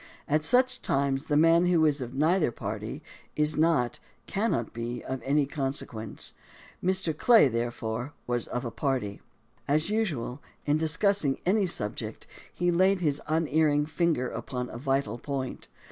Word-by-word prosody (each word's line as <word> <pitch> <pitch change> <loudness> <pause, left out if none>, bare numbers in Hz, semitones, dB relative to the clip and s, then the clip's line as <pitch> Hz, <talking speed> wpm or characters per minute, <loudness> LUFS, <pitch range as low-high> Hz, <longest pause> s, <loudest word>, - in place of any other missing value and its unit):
At 155 +1 +1
such 255 +7 +3
times 135 0 0
the 145 - +1
man 165 +3 +5
who 170 -3 +4
is 145 -2 +2
of 125 +1 -6
neither 160 +1 +2
party 110 +6 -5 0.3
is 150 0 +2
not, 155 -7 +2 0.3
cannot 200 - -1
be, 120 +1 -4
of 130 -1 -4
any 140 +3 +2
consequence. 135 -6 -3 0.5
Mr. 185 -3 +1
Clay, 225 - +6
therefore, 120 +1 -3
was 120 -1 -2
of 125 +1 -3
a 120 - -3
party. 125 -9 -2 0.5
As 155 +7 +1
usual, 150 - -1 0.2
in 145 +1 +2
discussing 160 -2 +2
any 195 +1 +3
subject, 105 -11 -2 0.3
he 175 0 0
laid 185 +2 +3
his 150 -3 0
un 160 +1 +1
erring 150 -1 +3
finger 155 -4 0
upon 125 +2 -5
a - - -7
vital 135 -4 -1
point. 135 -2 -4
145 Hz, 150 wpm, -28 LUFS, 125-165 Hz, 0.5 s, Clay